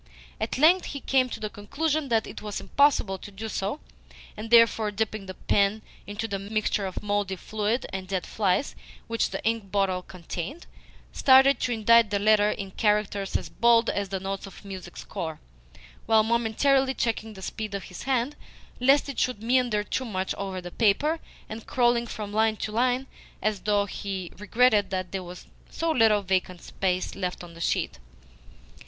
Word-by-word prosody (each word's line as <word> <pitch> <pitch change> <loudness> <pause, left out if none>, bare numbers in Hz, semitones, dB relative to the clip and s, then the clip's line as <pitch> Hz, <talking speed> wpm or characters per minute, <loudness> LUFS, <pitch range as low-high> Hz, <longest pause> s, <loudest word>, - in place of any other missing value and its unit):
At - - -2
length 340 +6 +5
he 280 - -5
came 260 -1 +2
to - - -6
the 215 - -3
conclusion 290 +7 -2
that 225 -2 +2
it - - -8
was 210 -1 -4
impossible 265 -9 +2
to - - -9
do 205 +3 -7
so, 210 +5 -3 0.6
and 215 +2 -7
therefore, 230 -2 +5
dipping 210 -1 -3
the 185 - -7
pen 200 +3 +1 0.2
into 205 +2 -4
the 200 -2 -3
mixture 205 0 -1
of 185 - -6
mouldy 205 -2 0
fluid 215 +5 -2
and 190 -1 -4
dead 185 -2 -2
flies 200 +4 0 0.3
which 230 0 0
the - - -6
ink 225 -3 0
bottle 195 -2 +1
contained, 180 - -7 0.5
started 270 +1 +6
to 250 - -1
indite 230 0 +5
the 200 - +1
letter 210 0 +4
in 195 -2 -4
characters 210 -1 0
as - - -8
bold 235 0 +4
as 200 -1 -2
the 190 0 -2
notes 195 +1 -4
of 195 - -13
a - - -10
music 190 -2 -8
score, 165 -6 -5 0.7
while 220 -1 +5
momentarily 250 +4 +2
checking 225 -2 -2
the 190 - -10
speed 215 0 -4
of 200 - -4
his 180 - -9
hand, 265 +1 0 0.4
lest 270 +4 +4
it 280 - -4
should 250 -4 -1
meander 240 -3 +2
too 260 - -2
much 190 -6 -2
over 195 -2 -4
the 175 -1 -8
paper, 265 - +2 0.3
and 220 +1 -8
crawling 240 -1 +2
from 210 -2 -6
line 220 0 +3
to 215 - -4
line 250 +3 +1 0.3
as 215 -2 -1
though 205 0 +1
he 190 -2 -5
regretted 210 0 +3
that 185 -2 -3
there 195 - -3
was 180 0 -10 0.2
so 330 0 -1
little 220 -7 +4
vacant 185 -1 -1
space 185 0 -2
left 180 -2 -4
on 170 -1 -11
the 170 - -11
sheet. 65 - -1
210 Hz, 180 wpm, -26 LUFS, 195-235 Hz, 0.7 s, started